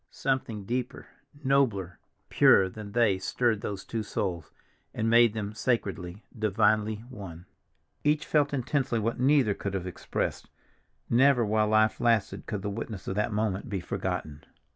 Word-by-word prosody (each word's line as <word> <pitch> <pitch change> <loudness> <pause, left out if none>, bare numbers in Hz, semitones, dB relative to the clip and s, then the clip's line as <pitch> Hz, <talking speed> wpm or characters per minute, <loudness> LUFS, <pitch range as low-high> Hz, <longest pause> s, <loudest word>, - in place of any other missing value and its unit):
Something 125 -6 -2
deeper, 125 +3 -3 0.4
nobler, 115 -10 +1 0.3
purer 95 -1 +5
than 105 +1 -9
they 110 -5 +3
stirred 110 +2 0
those 100 -2 -5
two 115 - -3
souls, 90 -6 -3 0.4
and 110 - -1
made 115 -1 +5
them 105 -1 -4
sacredly, 100 -5 -2
divinely 110 0 +1
one. 90 -7 -9 0.6
Each 150 0 +2
felt 145 -2 +2
intensely 135 -2 -1
what 115 +2 -1
neither 130 -5 +4
could 100 0 -4
have 95 -2 -3
expressed. 90 - -4 0.6
Never, 125 0 +4
while 105 0 +2
life 110 0 +3
lasted, 115 -4 +1
could 105 -4 -4
the - - -2
witness 105 -2 -6
of - - -1
that 105 +3 -1
moment 105 +2 -1
be 100 -2 -2
forgotten. 75 -4 -4
110 Hz, 145 wpm, -28 LUFS, 100-120 Hz, 0.6 s, purer